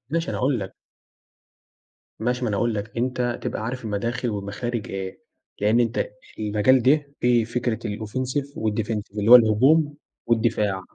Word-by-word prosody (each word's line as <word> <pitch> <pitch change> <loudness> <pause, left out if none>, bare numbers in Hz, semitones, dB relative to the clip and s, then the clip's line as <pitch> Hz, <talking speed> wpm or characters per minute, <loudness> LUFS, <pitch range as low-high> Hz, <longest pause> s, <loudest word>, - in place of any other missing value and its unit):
أنا 165 0 -1
هاقول 130 -2 +1
لك. 95 - -6 1.5
ماشي 125 +3 -1
ما 125 - 0
أنا 100 - -1
هاقول 120 0 +1
لك، 105 +3 -5
أنت 125 0 -1
تبقى - - -3
عارف 120 +1 -4
المداخل 115 +4 -2
والمخارج 105 +3 -4
إيه، 95 -1 -6 0.4
لأن 110 +3 +3
أنت 120 - 0 0.3
المجال 110 +5 +3
ده 140 +1 +2
فيه 120 -2 +3
فكرة 120 -1 -2
الoffensive 130 +7 -3
والdefensive 110 -1 -3
اللي 105 +3 +2
هو 125 - +13
الهجوم 135 +7 +4 0.3
والدفاع. 110 -4 +1
115 Hz, 145 wpm, -24 LUFS, 105-125 Hz, 1.5 s, هو